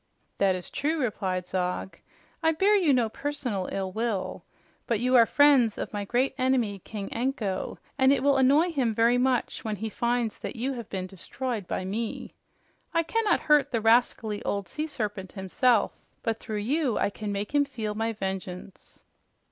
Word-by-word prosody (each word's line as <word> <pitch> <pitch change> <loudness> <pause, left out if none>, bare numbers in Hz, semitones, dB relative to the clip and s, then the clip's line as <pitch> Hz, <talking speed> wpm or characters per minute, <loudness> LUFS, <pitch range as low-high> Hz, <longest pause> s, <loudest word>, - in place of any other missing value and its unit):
"That 195 -2 +3
is 180 - -7
true," 310 +3 -1
replied 190 -7 -1
Zog. 180 +1 -3 0.4
"I 320 0 +3
bear 395 +6 +4
you 355 -7 +4
no 245 -4 +3
personal 245 -6 -3
ill 190 -1 -2
will. 190 -5 -2 0.4
But 230 -3 +1
you 255 +1 +2
are 230 -2 +7
friends 275 -7 +5
of - - -5
my 205 -1 -3
great 250 +6 +1
enemy, 250 -6 +1
King 200 +1 -6
Anko, 230 -6 -2 0.2
and 265 0 +6
it 275 -2 +2
will 280 -1 +4
annoy 285 +7 +4
him 250 -8 0
very 235 +2 +4
much 255 0 0
when 215 -3 -2
he 220 +3 -4
finds 235 0 -1
that - - -5
you 255 +4 -2
have 235 -4 -7
been 185 -2 -3
destroyed 205 +3 -5
by 185 - -3
me. 215 +4 -4 0.6
I 330 - +4
cannot 450 +5 +1
hurt 295 -2 +3
the 235 - +1
rascally 225 -2 +2
old 200 -2 -2
sea 305 - -4
serpent 205 -9 -4
himself, 215 +4 +1 0.2
but 225 -1 -1
through 215 - -5
you 280 -1 +1
I - - +1
can 210 +1 -5
make 200 +5 -3
him 290 -1 +4
feel 230 -7 -4
my 225 +2 -1
vengeance." 190 -2 -6
230 Hz, 180 wpm, -27 LUFS, 200-265 Hz, 0.6 s, are